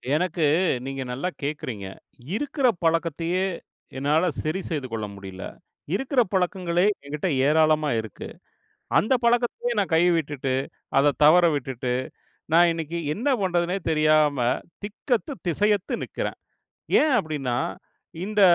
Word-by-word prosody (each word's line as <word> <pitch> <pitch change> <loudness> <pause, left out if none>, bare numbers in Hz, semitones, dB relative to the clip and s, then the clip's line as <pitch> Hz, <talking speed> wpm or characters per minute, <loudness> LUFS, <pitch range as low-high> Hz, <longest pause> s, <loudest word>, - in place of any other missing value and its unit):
எனக்கு 170 -1 0 0.4
நீங்க 135 0 -4
நல்லா 135 +9 -2
கேட்கறீங்க. 130 -9 -4 0.5
இருக்கிற 275 0 0 0.2
பழக்கத்தையே 165 +2 +1 0.5
என்னால 150 +5 +2 0.2
சரி 155 +5 -1
செய்து 145 -5 -3
கொள்ள 110 -2 -3
முடியல. 95 -1 -9 0.5
இருக்கற 270 +2 +1
பழக்கங்களே 180 -1 +1 0.2
என்கிட்ட 150 +5 -2 0.2
ஏராளமா 155 0 +3
இருக்கு. 110 -3 -9 0.7
அந்த 220 - +1
பழக்கத்தையே 240 0 +1
நான் 190 -4 0
கை 165 - +5
விட்டுட்டு 140 -4 -2 0.4
அதை 145 +1 +5
தவற 175 +4 +7
விட்டுட்டு 130 -2 -3 0.6
நான் 170 +1 +6
இன்னைக்கு 165 +1 -4 0.2
என்ன 245 - -2
பண்ணுறதுன்னே 180 0 0
தெரியாம 155 -2 +3 0.4
திக்கத்து 235 +6 -2
திசையத்து 205 +3 +1
நிக்கிறேன். - - -4 0.6
ஏன் 310 - +3
அப்படின்னா, 145 - -2 0.7
இந்த 210 0 0
165 Hz, 115 wpm, -25 LUFS, 145-190 Hz, 0.7 s, தவற